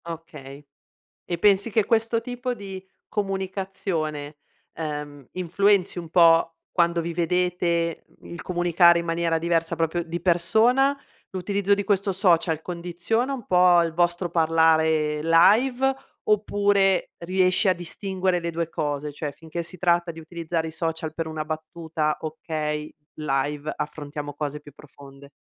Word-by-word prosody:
Okay, 150 -4 -9 0.6
e 175 - -3
pensi 200 +1 +4
che 220 0 +2
questo 225 +1 +1
tipo 250 0 -4
di 195 -4 -8 0.3
comunicazione, 190 -7 -3 0.3
ehm, 150 -3 -6
influenzi 185 +1 +1
un 170 -2 -6
po' 165 0 +5 0.2
quando 170 -1 +2
vi 170 +1 -4
vedete? 170 -1 0 0.2
Il 170 - -9
comunicare 175 -1 +4
in - - -6
maniera 165 0 0
diversa, 165 0 0
proprio 165 +1 0
di 170 +1 -5
persona, 225 +11 +3 0.3
l'utilizzo 200 +2 0
di 200 0 -3
questo 200 0 +1
social 170 -4 +2
condiziona 180 +10 -2
un 250 -4 -7
po' 180 -1 +5
il 165 -1 -2
vostro 175 +1 0
parlare 160 -2 +2
live 245 +11 +4 0.3
oppure 205 -2 +2
riesci 185 +2 +2
a 185 - +4
distinguere 185 +1 -2
le 170 0 -3
due 165 0 -3
cose? 145 -1 -3
Cioè, 150 0 -4
finché 160 +3 -6
si 170 +2 -9
tratta 175 0 +1
di 165 0 -9
utilizzare 165 0 -3
i - - -6
social 160 0 -3
per 165 0 -4
una 155 -1 -4
battuta, 155 0 -3
okay, 155 -1 -4 0.3
live 145 0 -2
affrontiamo 145 -1 -5
cose 145 +1 -4
più 145 0 -14
profonde? 140 -1 -15
170 Hz, 135 wpm, -24 LUFS, 160-190 Hz, 0.6 s, po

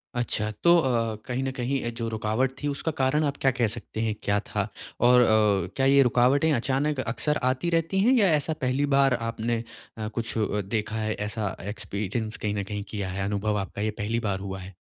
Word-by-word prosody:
अच्छा 110 -3 -1
तो 170 0 +7
अ, 115 -7 +1
कहीं 125 +1 -2
न 135 - -1
कहीं 130 +2 -2
अ, 120 - 0
जो 115 0 -4
रुकावट 110 +4 0
थी 145 - -1
उसका 145 +3 -2
कारण 135 +4 +2
आप 140 -1 -2
क्या 135 - +4
कह 120 -3 +1
सकते 110 0 -6
हैं 110 -1 0
क्या 100 0 +2
था? 105 0 -3 0.3
और 125 +1 +6
अ, - - +5 0.5
क्या 135 - +1
ये 140 +1 +6
रुकावटें 130 +6 +3
अचानक 135 +4 0
अक्सर 130 +5 0
आती 130 +6 +1
रहती 165 +3 +1
हैं 235 +7 +4
या 200 - +5
ऐसा 150 +2 -1
पहली 130 +2 +1
बार 135 -1 +4
आपने 115 -1 -2 0.3
अ, 110 -1 -3
कुछ 115 +1 -4
अ, 105 -1 0
देखा 105 +2 -3
है 110 0 -1
ऐसा 105 -2 -3
एक्सपीरियंस 110 +2 -3
कहीं 105 -1 -2
न 100 - -1
कहीं 105 +1 -5
किया 100 -3 -3
है, 95 +1 -3
अनुभव 105 +1 -1
आपका 100 +1 -5
ये 110 0 0
पहली 115 +3 0
बार 95 - -1
हुआ 95 -1 -5
है? 95 +1 -10
115 Hz, 215 wpm, -26 LUFS, 105-135 Hz, 0.5 s, तो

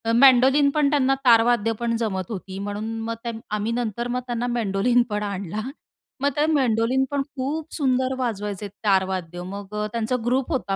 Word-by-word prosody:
Mandolin 270 +3 +6
पण 295 -2 +3
त्यांना, 270 -2 +3
तारवाद्यं 230 -1 +4
पण 235 -1 0
जमत 190 -6 -2
होती. 190 -2 -6
म्हणून 205 +2 -4 0.2
मग 230 +1 -3
त्यां 235 -1 -3 0.2
आम्ही 215 +2 -1
नंतर 235 0 -2
मग 250 +1 -1
त्यांना 240 0 -2
मेंडोलिन 235 +1 +2
पण 210 0 -2
आणला. 200 0 -4 0.6
मग 285 - +3
ते 295 - +3
मेंडोलिन 255 -2 +2
पण 285 -1 0
खूप 295 +4 -3
सुंदर 260 -3 +1
वाजवायचे 210 -4 -3 0.2
तारवाद्यं. 185 -3 0
मग 200 +2 -7
अ, - - -1
त्यांचा 230 +1 -1
ग्रुप 255 +4 0
होता 240 -9 -1
230 Hz, 165 wpm, -23 LUFS, 205-255 Hz, 0.6 s, मेंडोलिन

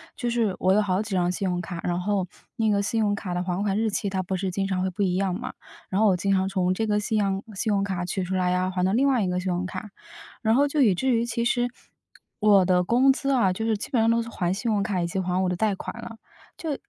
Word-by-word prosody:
就 245 - -2
是 225 -5 +1
我 185 +1 +3
有 210 - +4
好 190 -2 0
几 215 0 -7
张 180 -1 +2
信 195 +1 -2
用 180 -1 -1
卡， 170 0 -6
然 175 0 -1
后 195 -1 0 0.3
那 220 -1 +1
个 200 -1 +2
信 200 +3 -1
用 210 -2 +2
卡 195 -3 -4
的 180 - -1
还 180 +1 -2
款 200 -1 0
日 220 0 +1
期， 200 - -1
它 190 -1 -2
不 190 +1 -3
是 190 +1 -2
经 195 +2 -1
常 190 -2 -1
会 190 - 0
不 195 +3 -2
一 185 -2 +1
样 190 -1 0
嘛。 - - -6 0.4
然 195 +3 0
后 220 - +5
我 190 -3 +3
经 195 +2 +1
常 190 0 +1
从 185 -2 +1
这 220 +3 -1
个 210 0 +2
信 215 +1 -1
样 195 -1 0
信 215 +2 -1
用 200 -1 +2
卡 190 -3 -2
取 185 +1 -2
出 180 +1 -4
来 180 -1 +1
啊， 185 +1 0
还 180 -1 -1
到 190 - +2
另 265 +5 +3
外 260 -4 +3
一 - - 0
个 180 0 -1
信 185 0 -2
用 180 +1 -2
卡， 195 +2 -7 0.5
然 220 -1 +3
后 285 +3 +4
就 290 +1 0
以 210 -8 +4
至 260 +5 +1
于 230 - +1
其 235 0 -2
实， 245 0 +2 0.7
我 205 -3 +5
的 180 -1 +3
工 255 +7 +4
资 275 +1 -3
啊， 230 -9 +3
就 220 - -4
是 220 -2 +1
基 200 - -6
本 240 -5 +2
上 225 - +3
都 230 0 +3
是 230 - -8
还 180 -6 -1
信 225 +4 -2
用 205 -2 +1
卡 200 -2 -1
以 170 - 0
及 190 +3 -3
还 180 0 -1
我 - - +1
的 180 - -1
贷 205 +2 +1
款 - - -7
了。 230 -1 -9 0.4
就 315 -4 -3
195 Hz, 325 characters per minute, -25 LUFS, 185-220 Hz, 0.7 s, 后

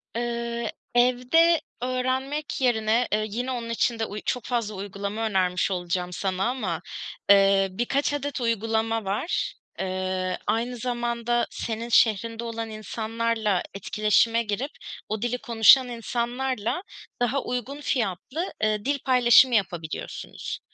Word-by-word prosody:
Iıı, 235 -1 -2 0.3
evde 255 +8 +4 0.2
öğrenmek 260 +4 -2
yerine, 230 -1 +2
eee, 215 0 +1
yine 245 +5 -3
onun 235 -2 -4
için 230 0 0
de 225 - +1
uy 210 0 -6
çok 250 -3 -1
fazla 230 -4 -1
uygulama 200 +3 -4
önermiş 185 -2 +1
olacağım 180 0 -2
sana 190 0 -1
ama, 190 -10 -2 0.5
eee, 195 -1 +6
birkaç 270 +8 0
adet 285 -2 -3
uygulama 225 -1 0
var. 205 - -1 0.3
Iıı, 185 -1 -2
aynı 240 +2 0
zamanda 240 0 -1
senin 230 +1 -4
şehrinde 230 0 +3
olan 230 -1 -4
insanlarla 220 -2 -1
etkileşime 215 +3 +2
girip 220 +7 -3 0.4
o 215 0 -2
dili 240 +1 0
konuşan 240 +3 +6
insanlarla, 240 - -2 0.4
daha 260 +3 +1
uygun 250 +4 -4
fiyatlı, 255 - -2
ııı, 215 0 0
dil 280 0 +1
paylaşımı 250 -1 +6
yapabiliyorsunuz. 170 -6 -3
230 Hz, 120 wpm, -25 LUFS, 205-250 Hz, 0.5 s, eee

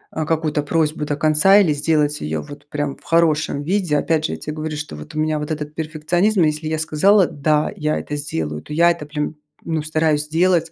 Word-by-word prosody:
э, 155 - -1
какую-то 155 -2 0
просьбу 155 0 0
до 145 -1 -2
конца 155 +6 +5
или 175 -7 +3
сделать 150 0 0
её 75 0 -2
вот 145 - -12
прям 145 -2 -2
в - - -25
хорошем 160 -3 +2
виде. 175 -1 0
Опять 155 +1 +1
же, - - -2
я - - -5
те 150 - -6
говорю, 155 0 -4
что 150 - -6
вот 75 0 -10
у - - -2
меня 155 0 +1
вот 150 +1 -4
этот 150 -1 -4
перфекционизм, 165 +6 +1
если 155 0 0
я 160 0 -1
сказала: 180 +5 +4
"Да, 150 +1 0
я 150 0 -1
это 150 - -5
сделаю", 80 - -4
то - - -14
я 170 +3 +5
это 170 -3 -5
прям, 150 +1 -3 0.3
ну, 160 -2 -1
стараюсь 155 -1 0
делать 165 0 +2
155 Hz, 220 wpm, -20 LUFS, 150-160 Hz, 0.3 s, конца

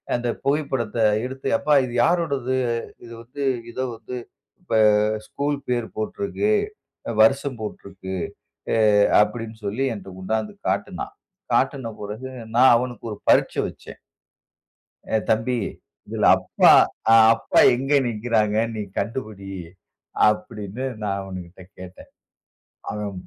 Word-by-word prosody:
அந்த 120 0 -2 0.2
புகைப்படத்த 135 -6 -1 0.3
எடுத்து, 130 +1 -6
அப்பா 150 +1 +3
இது 120 - -7
யாரோடது? 140 -7 0 0.5
இது 115 - -12
வந்து 140 +4 -7 0.3
இதோ 130 +2 -3
வந்து, 115 +3 -7 0.4
இப்ப 180 - -6 0.5
ஸ்கூல் 145 0 -2
பேர் 120 -2 0
போட்டிருக்கு, 200 - -1 0.7
வருஷம் 135 +1 +2
போட்டிருக்கு, 95 -3 -7 0.6
எ - - +2 0.4
அப்டினு 115 0 -2
சொல்லி 110 +7 -1
என்ட்ட 100 -2 -9
கொண்டாந்து 110 +3 -2 0.2
காட்டுனான். - - -3 0.4
காட்டின 130 -3 +1
பிறகு 110 +6 -6 0.3
நான் 125 0 +7
அவனுக்கு 120 0 -5
ஒரு 105 - -9
பரீட்சை - - +3
வெச்சேன். - - -13 1.1
ஏ 110 - +5
தம்பி 115 +3 +1 0.5
"இதில - - -1
அப்பா, - - +4 0.4
அ - - +8 0.2
அப்பா - - +1 0.2
எங்க 135 +4 -1
நிக்கிறாங்க? 110 -2 0 0.2
நீ 105 - -3 0.2
கண்டுபிடி" 105 -3 -5 0.8
அப்டினு 105 +1 -3 0.2
நான் 100 -1 -1
அவனுகிட்ட 95 -1 -9 0.2
கேட்டேன். 95 0 -11 0.8
அவன் 105 -1 -4
115 Hz, 115 wpm, -23 LUFS, 105-130 Hz, 1.1 s, அ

